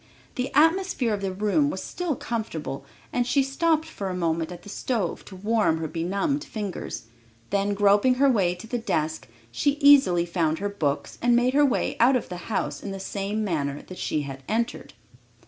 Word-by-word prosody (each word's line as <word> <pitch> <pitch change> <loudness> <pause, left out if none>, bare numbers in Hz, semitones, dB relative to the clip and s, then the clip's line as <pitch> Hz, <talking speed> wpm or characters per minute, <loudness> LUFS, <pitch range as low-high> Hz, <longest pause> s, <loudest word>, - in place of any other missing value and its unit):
The 255 +1 -3
atmosphere 325 - +3
of 205 - -2
the 195 -1 -1
room 210 +10 +1
was - - -4
still 350 -5 -2
comfortable 165 -14 -4 0.3
and 245 -1 +1
she 275 +2 +3
stopped 315 +3 +1
for 205 -12 -5
a 185 - -3
moment 165 -1 -1
at 175 -1 -9
the - - -13
stove 215 -4 -2
to 190 - -11
warm 205 -3 +1
her 160 0 -3
benumbed 200 - -1
fingers, 205 -5 -5 0.5
then 200 0 +1
groping 205 +5 +4
her 275 +2 +4
way 195 -9 +2
to 180 +5 -11
her 245 - -2
desk, 155 - -1 0.2
she 285 - +1
easily 280 - +5
found 165 -2 0
her 205 +3 -2
books 155 -8 -2
and 240 0 +4
made 245 +2 +3
her 290 +1 +5
way 275 -4 +1
out 250 +3 +5
of 250 - -2
the 180 - -5
house 215 - -2
in 205 - -6
the 195 0 -5
same 200 +2 -3
manner 145 -7 -2
that 185 - -10
she 150 - -1
had 135 -1 -7
entered. 230 +2 -2
205 Hz, 195 wpm, -25 LUFS, 175-255 Hz, 0.5 s, easily